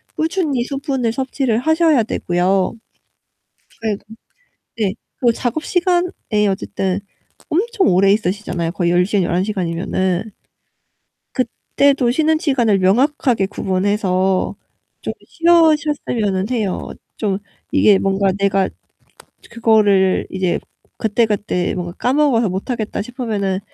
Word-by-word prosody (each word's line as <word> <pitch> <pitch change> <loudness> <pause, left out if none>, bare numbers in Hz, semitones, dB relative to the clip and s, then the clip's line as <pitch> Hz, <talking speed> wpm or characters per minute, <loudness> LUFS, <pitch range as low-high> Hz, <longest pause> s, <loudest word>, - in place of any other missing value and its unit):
꾸준히 315 -6 0
수분을 270 -3 -2
섭취를 260 -3 -1
하셔야 315 -2 +3
되고요. 185 -1 0 1.1
네. 215 -2 0 0.8
네. 200 -4 0 0.2
그리고 240 -2 +3
작업 250 +7 -2
시간에 355 0 +1 0.4
어쨌든 190 0 -2 0.5
엄청 415 +4 +1
오래 195 +2 +4
있으시잖아요 185 -4 -1
거의 175 -2 0
10 180 +1 +3
시간, 205 -2 +1
11 180 +2 0
시간이면은. 185 +1 -2 1.0
그때도 255 +1 +1
쉬는 315 +3 +2
시간을 240 - +2
명확하게 240 +1 +2
구분해서 190 -1 0 0.5
좀 - - -4
쉬어셨으면은 300 - +2
해요. 215 -6 -2 0.3
좀 200 -3 -1 0.3
이게 205 -2 +5
뭔가 195 0 +1
'내가 195 -1 +1 0.8
그거를 210 -5 +3
이제 185 -2 -1 0.4
그때그때 210 -4 0
뭔가 175 -1 -4
까먹어서 250 -4 +2
못하겠다.' 215 +4 -3
싶으면은 215 -6 -2
215 Hz, 260 characters per minute, -19 LUFS, 190-270 Hz, 1.1 s, 이게